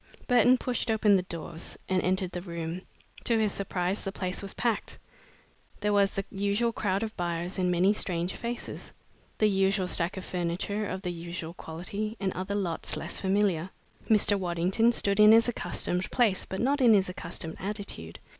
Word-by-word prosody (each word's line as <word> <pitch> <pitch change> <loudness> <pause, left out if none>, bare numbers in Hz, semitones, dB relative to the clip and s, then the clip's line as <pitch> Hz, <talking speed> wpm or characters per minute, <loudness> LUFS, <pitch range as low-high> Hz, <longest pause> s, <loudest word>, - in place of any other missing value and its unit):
Burton 245 0 +5
pushed 245 -1 -2
open 215 -2 +4
the 190 - +3
doors 170 -1 -6
and 185 -1 +1
entered 185 0 0
the 180 - -4
room. 170 0 -5 0.4
To 230 - +3
his 215 -2 +2
surprise, 190 0 -2
the 195 - -3
place 185 -1 -3
was 200 -1 -5
packed. 235 -3 -1 0.8
There 210 0 +1
was 200 -1 +3
the 195 - -2
usual 205 +4 +1
crowd 200 -1 0
of 220 0 -5
buyers 175 +1 -2
and 180 -1 +2
many 180 +3 +4
strange 175 -3 -1
faces; 240 0 -5 0.4
the 215 - +3
usual 195 -1 +2
stacks 175 +1 +1
of 190 - -6
furniture 180 +4 -2
of 190 +1 -5
the 180 - -2
usual 170 -1 -6
quality, 200 +7 -5
and 190 -2 -1
other 190 +2 -3
lots 180 -5 -2
less - - -3
familiar. 190 -3 +1 0.4
Mr. 205 -2 +4
Waddington 185 +6 +2
stood 200 -3 +3
in 210 +1 +9
his 230 +1 +6
accustomed 180 -4 -1
place 220 -7 +1
but 190 - -4
not 275 +3 +2
in 235 -4 +7
his 195 -1 +3
accustomed 170 -2 -5
attitude. 195 - -5
195 Hz, 175 wpm, -28 LUFS, 180-210 Hz, 0.8 s, in